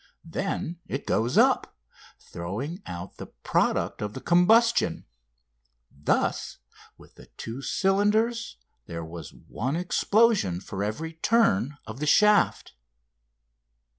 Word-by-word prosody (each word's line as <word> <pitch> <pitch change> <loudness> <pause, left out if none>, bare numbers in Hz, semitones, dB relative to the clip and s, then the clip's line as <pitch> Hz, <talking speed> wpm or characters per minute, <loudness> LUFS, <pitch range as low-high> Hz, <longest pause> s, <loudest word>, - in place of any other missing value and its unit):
Then 170 0 -3
it 135 - -4
goes 115 +3 0
up, - - +3 0.4
throwing 120 - -6
out 90 +1 -7
the - - -8
product - - -1
of 105 +5 -5
combustion. 225 +7 +3 0.9
Thus 70 +1 -1 0.4
with - - -18
the - - -16
two 115 +4 -6
cylinders 210 - +1 0.3
there 85 -1 -6
was 85 +1 -9
one 130 +6 -4
explosion 185 - +2
for 100 +1 -5
every 155 +11 -4
turn 160 - +2
of 110 +4 -8
the 150 - -2
shaft. 210 - +3
155 Hz, 105 wpm, -26 LUFS, -, 0.9 s, up